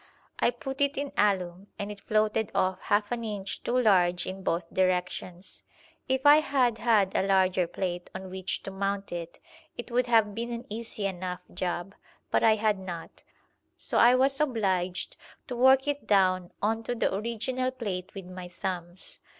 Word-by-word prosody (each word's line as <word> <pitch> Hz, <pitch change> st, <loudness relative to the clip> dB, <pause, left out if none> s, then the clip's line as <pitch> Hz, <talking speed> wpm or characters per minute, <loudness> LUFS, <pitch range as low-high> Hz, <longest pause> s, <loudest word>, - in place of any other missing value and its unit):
I -, -, +4 dB
put 265 Hz, +3 st, -6 dB
it 280 Hz, 0 st, +2 dB
in 280 Hz, 0 st, -2 dB
alum, 190 Hz, -2 st, +1 dB
and 205 Hz, +1 st, -4 dB
it 205 Hz, -1 st, -10 dB
floated 215 Hz, 0 st, +1 dB
off 185 Hz, 0 st, +1 dB
half 205 Hz, +1 st, +1 dB
an 240 Hz, -1 st, -2 dB
inch 205 Hz, -3 st, -4 dB
too 245 Hz, -, 0 dB
large 180 Hz, -7 st, +3 dB
in 190 Hz, +1 st, -6 dB
both 170 Hz, -2 st, -2 dB
directions. 180 Hz, 0 st, -1 dB, 0.5 s
If 265 Hz, +1 st, 0 dB
I 290 Hz, +1 st, +9 dB
had 260 Hz, -6 st, +2 dB
had 210 Hz, -5 st, +3 dB
a -, -, +3 dB
larger 185 Hz, -2 st, +3 dB
plate 175 Hz, 0 st, -4 dB
on 190 Hz, 0 st, -7 dB
which 190 Hz, 0 st, -3 dB
to 195 Hz, -, -6 dB
mount 195 Hz, +1 st, -2 dB
it, 170 Hz, -1 st, -6 dB, 0.4 s
it 240 Hz, -, -7 dB
would 250 Hz, +1 st, +2 dB
have 220 Hz, -3 st, +4 dB
been 235 Hz, +3 st, -4 dB
an 235 Hz, 0 st, -5 dB
easy 220 Hz, -2 st, -4 dB
enough 180 Hz, -2 st, -3 dB
job, 175 Hz, +1 st, -3 dB, 0.4 s
but -, -, +2 dB
I 220 Hz, -1 st, +6 dB
had 210 Hz, -2 st, +1 dB
not, 175 Hz, -3 st, -8 dB, 0.6 s
so -, -, +1 dB
I 245 Hz, +1 st, +7 dB
was 270 Hz, +1 st, +3 dB
obliged 200 Hz, -, 0 dB, 0.3 s
to 255 Hz, -, -5 dB
work 265 Hz, +2 st, +5 dB
it 290 Hz, 0 st, -2 dB
down 185 Hz, -3 st, +3 dB
on 225 Hz, +2 st, +1 dB
to 245 Hz, -, -1 dB
the 225 Hz, -, 0 dB
original 235 Hz, +5 st, -1 dB
plate 200 Hz, -8 st, -5 dB
with 195 Hz, -2 st, -7 dB
my 180 Hz, 0 st, -8 dB
thumbs. 175 Hz, 0 st, -5 dB
200 Hz, 175 wpm, -28 LUFS, 185-240 Hz, 0.6 s, I